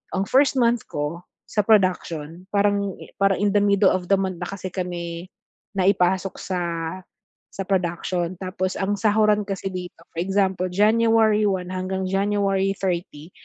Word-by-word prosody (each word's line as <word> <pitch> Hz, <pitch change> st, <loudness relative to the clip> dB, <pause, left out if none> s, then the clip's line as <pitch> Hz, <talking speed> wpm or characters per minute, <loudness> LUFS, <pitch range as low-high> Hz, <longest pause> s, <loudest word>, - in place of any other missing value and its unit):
Ang 190 Hz, -, +1 dB
1st 270 Hz, +1 st, +4 dB
month 235 Hz, -1 st, +2 dB
ko 150 Hz, +4 st, -4 dB, 0.2 s
sa 210 Hz, -2 st, 0 dB
production 180 Hz, -5 st, +1 dB
parang 200 Hz, -1 st, +2 dB, 0.3 s
parang 195 Hz, -1 st, +3 dB
in 205 Hz, -, +3 dB
the -, -, +6 dB
mddle 200 Hz, -1 st, +4 dB
of 180 Hz, -1 st, -2 dB
the -, -, +7 dB
month 190 Hz, -2 st, -2 dB
na 175 Hz, -, -3 dB
kasi 190 Hz, -1 st, -5 dB
kami 175 Hz, -2 st, -4 dB, 0.5 s
naipasok 190 Hz, 0 st, +2 dB
sa 185 Hz, -2 st, -3 dB, 0.9 s
sa 195 Hz, -, -4 dB
production. 175 Hz, -1 st, -1 dB
Tapos 185 Hz, 0 st, -3 dB
ang 200 Hz, +1 st, 0 dB
sahuran 210 Hz, 0 st, +3 dB
kasi 195 Hz, -1 st, -4 dB
dito, 180 Hz, -1 st, -6 dB, 0.2 s
for 165 Hz, -, -5 dB
example, 190 Hz, -1 st, 0 dB
January 220 Hz, +1 st, +4 dB
1 185 Hz, -2 st, -2 dB
hanggang 185 Hz, +1 st, -2 dB
January 195 Hz, 0 st, +1 dB
30 175 Hz, -3 st, -3 dB
190 Hz, 145 wpm, -23 LUFS, 180-205 Hz, 0.9 s, the